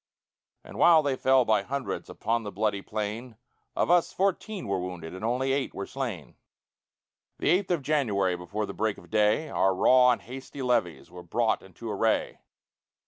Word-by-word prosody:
And -, -, -10 dB
while 165 Hz, -3 st, +6 dB
they 140 Hz, -2 st, 0 dB
fell 130 Hz, -1 st, +3 dB
by 110 Hz, -3 st, +3 dB
hundreds 135 Hz, +6 st, -4 dB
Upon 115 Hz, +2 st, -1 dB
the 105 Hz, -2 st, -6 dB
bloody 105 Hz, -1 st, -1 dB
plain, 110 Hz, +3 st, -5 dB, 0.4 s
Of -, -, +1 dB
us, 175 Hz, -1 st, +3 dB
fourteen 195 Hz, -, -2 dB
were 100 Hz, -1 st, 0 dB
wounded 90 Hz, -3 st, -6 dB
And 95 Hz, -, -8 dB
only 130 Hz, +4 st, 0 dB
eight 135 Hz, -1 st, -2 dB
were 100 Hz, -, -4 dB
slain. 120 Hz, -, -6 dB, 1.0 s
The -, -, 0 dB
eighth 185 Hz, +2 st, +2 dB
of 170 Hz, -6 st, 0 dB
January, 105 Hz, -12 st, +1 dB
Before 100 Hz, +5 st, -4 dB
the -, -, -7 dB
break 110 Hz, -2 st, -1 dB
of -, -, -16 dB
day, 110 Hz, +8 st, +2 dB
Our 95 Hz, 0 st, +2 dB
raw 125 Hz, +5 st, +5 dB
and 120 Hz, -, +1 dB
hasty 135 Hz, +2 st, -8 dB
levies 115 Hz, -9 st, -1 dB
Were 90 Hz, -, -9 dB
brought 85 Hz, -, 0 dB
into -, -, -11 dB
array. -, -, 0 dB
115 Hz, 175 wpm, -27 LUFS, 100-135 Hz, 1.0 s, while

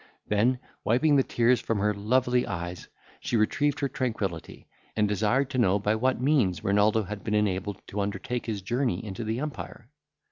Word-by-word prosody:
—Then 115 Hz, +5 st, +3 dB, 0.3 s
wiping 145 Hz, +7 st, +3 dB
the 135 Hz, -, +5 dB
tears 120 Hz, -1 st, +2 dB
from 115 Hz, -, -1 dB
her 105 Hz, +1 st, +1 dB
lovely 125 Hz, +4 st, +1 dB
eyes, 85 Hz, -3 st, -5 dB, 0.3 s
she 120 Hz, -, -1 dB
retrieved 145 Hz, +7 st, +1 dB
her 140 Hz, -, +2 dB
tranquillity, 110 Hz, -11 st, -4 dB, 0.3 s
and 105 Hz, -1 st, +2 dB
desired 110 Hz, +7 st, +1 dB
to 130 Hz, -, -1 dB
know 100 Hz, -4 st, +4 dB
by 105 Hz, +1 st, +1 dB
what 130 Hz, +3 st, +1 dB
means 125 Hz, -, +2 dB
Renaldo 105 Hz, +2 st, +3 dB
had 105 Hz, +1 st, -7 dB
been 105 Hz, -, -1 dB
enabled 100 Hz, -1 st, 0 dB
to 100 Hz, -, -2 dB
undertake 105 Hz, +5 st, -3 dB
his 105 Hz, -4 st, -3 dB
journey 120 Hz, -2 st, -1 dB
into 100 Hz, +2 st, -5 dB
the 110 Hz, +2 st, -2 dB
empire. 135 Hz, -4 st, -7 dB
110 Hz, 175 wpm, -27 LUFS, 100-125 Hz, 0.3 s, the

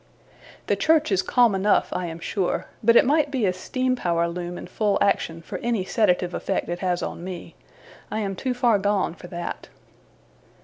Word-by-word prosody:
The -, -, +1 dB
church 315 Hz, -5 st, +3 dB
is 190 Hz, -1 st, +3 dB
calm 240 Hz, +1 st, +3 dB
enough, 195 Hz, +2 st, +2 dB
I 180 Hz, -1 st, -2 dB
am 165 Hz, 0 st, -6 dB
sure; 185 Hz, +2 st, -2 dB, 0.2 s
but 230 Hz, +2 st, +5 dB
it -, -, +7 dB
might 295 Hz, +2 st, +3 dB
be 260 Hz, -6 st, 0 dB
a 185 Hz, -, +2 dB
steam 255 Hz, +7 st, -1 dB
power 170 Hz, -6 st, 0 dB
loom 175 Hz, +1 st, -5 dB
in -, -, -7 dB
full 205 Hz, +3 st, 0 dB
action, 165 Hz, -4 st, 0 dB
for -, -, -6 dB
any 230 Hz, -5 st, -1 dB
sedative 180 Hz, -5 st, +1 dB
effect -, -, -2 dB
it 175 Hz, 0 st, -3 dB
has 180 Hz, -2 st, -1 dB
on -, -, -5 dB
me. 180 Hz, -1 st, -7 dB, 0.6 s
I -, -, -3 dB
am 195 Hz, -2 st, -2 dB
too 255 Hz, +5 st, -2 dB
far 240 Hz, -4 st, +3 dB
gone 200 Hz, -3 st, +1 dB
for 175 Hz, -, -12 dB
that. 175 Hz, 0 st, -6 dB
195 Hz, 190 wpm, -24 LUFS, 175-235 Hz, 0.6 s, it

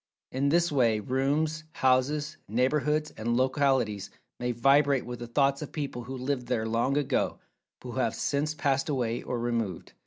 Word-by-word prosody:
In 140 Hz, +2 st, +1 dB
this 170 Hz, +2 st, +3 dB
way, 120 Hz, -6 st, +3 dB
rooms, 145 Hz, +7 st, 0 dB
houses, 145 Hz, +4 st, +1 dB
neighborhoods, 150 Hz, +6 st, +1 dB
and 120 Hz, +2 st, -1 dB
localities 130 Hz, -6 st, +1 dB, 0.3 s
may 125 Hz, 0 st, -1 dB
vibrate 135 Hz, +3 st, +3 dB
with 120 Hz, -1 st, -6 dB
the 120 Hz, -, -6 dB
thoughts 140 Hz, +3 st, +2 dB
of 150 Hz, -, -6 dB
people 140 Hz, -6 st, -4 dB
who 130 Hz, +2 st, -6 dB
lived 130 Hz, -1 st, -2 dB
there 115 Hz, -3 st, 0 dB
long 120 Hz, +5 st, +1 dB
ago, 140 Hz, -2 st, 0 dB, 0.4 s
but -, -, -8 dB
who -, -, -7 dB
have -, -, +1 dB
since 150 Hz, +2 st, -1 dB
passed 140 Hz, -1 st, 0 dB
away, 120 Hz, -4 st, -1 dB
or 125 Hz, -, -3 dB
removed. 115 Hz, -6 st, -2 dB
130 Hz, 165 wpm, -28 LUFS, 120-145 Hz, 0.4 s, this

